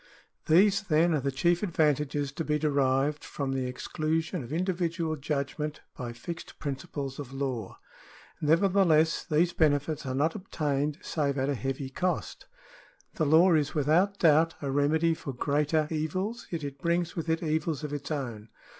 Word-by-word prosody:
These 195 +5 +5
then 170 -2 +2
are 155 - +2
the 140 +1 -1
chief 170 +6 +2
advantages 150 -6 +1
to 160 - -4
be 150 -1 +1
derived 140 -1 +1
from 135 -2 -3
the 130 -1 -1
exclusion 155 +5 -2
of 120 - -10
individual 170 -1 -1
judgment 150 +1 -3
by 125 -3 -5
fixed 165 +8 -8
principles 140 -1 -5
of 135 -3 -7
law. 130 -7 -3 0.6
Nevertheless 165 0 +3
these 170 +2 +1
benefits 150 -1 +1
are 130 - -2
not 155 +4 +2
obtained 150 -6 -2
save 145 -3 -1
at 135 +1 0
a - - +1
heavy 135 +1 -3
cost. 180 +6 -2 0.7
The 155 - 0
law 165 +5 +6
is 155 +1 +1
without 165 +7 +2
doubt 165 -1 +4
a 140 -2 -3
remedy 155 +4 +2
for 140 -4 -6
greater 150 +4 +1
evils, 185 +9 -2
yet 165 -3 -4
it 140 -1 -6
brings 170 0 0
with 165 -1 -3
it 160 +1 0
evils 155 -1 -1
of 150 -1 -4
its 145 -1 -5
own. 120 -8 -4
150 Hz, 160 wpm, -28 LUFS, 140-165 Hz, 0.7 s, law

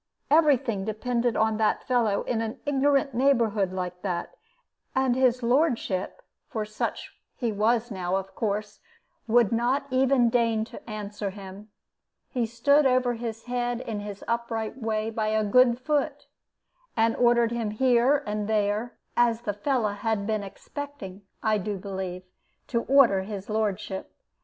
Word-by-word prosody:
Every 300 -3 +6
thing 230 -7 -3
depended 235 +3 -1
on 220 0 +2
that 215 -1 +1
fellow 230 -5 +1
in 225 -2 -1
an 225 -1 -4
ignorant 280 -1 +2
neighborhood 230 -7 +2
like 180 -1 -4
that; 180 -3 -3 0.6
and 260 -2 +2
his 255 -1 +2
lordship, 245 - 0 0.3
for 220 -2 -3
such 215 0 -4 0.2
he 235 -3 -1
was 225 +3 +1
now, 185 -2 -2
of 195 0 -3
course, 210 0 -3 0.5
would 235 -2 +4
not 245 +5 +1
even 255 -2 +3
deign 230 -2 +2
to 235 - -12
answer 210 -1 -4
him. 195 +1 -10 0.6
He 245 -4 0
stood 280 +6 +3
over 255 -1 +2
his 230 -1 -5
head 245 -1 -2
in 225 -4 -4
his 205 -1 -7
upright 230 -2 -2
way 220 0 -1
by 220 -1 -1
a 215 0 +1
good 240 +3 +4
foot, 290 +1 -1 0.7
and 225 0 +3
ordered 235 -1 +3
him 235 -2 -1
here 255 +5 +3
and 210 0 -2
there, 215 +2 0 0.2
as 235 -1 +3
the 210 -3 -2
fellow 230 +1 0
had 205 0 -2
been 215 0 0
expecting, 205 -1 -8 0.2
I 215 -1 +2
do 205 +1 -3
believe, 190 -2 -5 0.5
to 235 -2 +1
order 250 -8 +5
his 200 +1 -6
lordship. 205 -3 -2
225 Hz, 150 wpm, -26 LUFS, 210-245 Hz, 0.7 s, Every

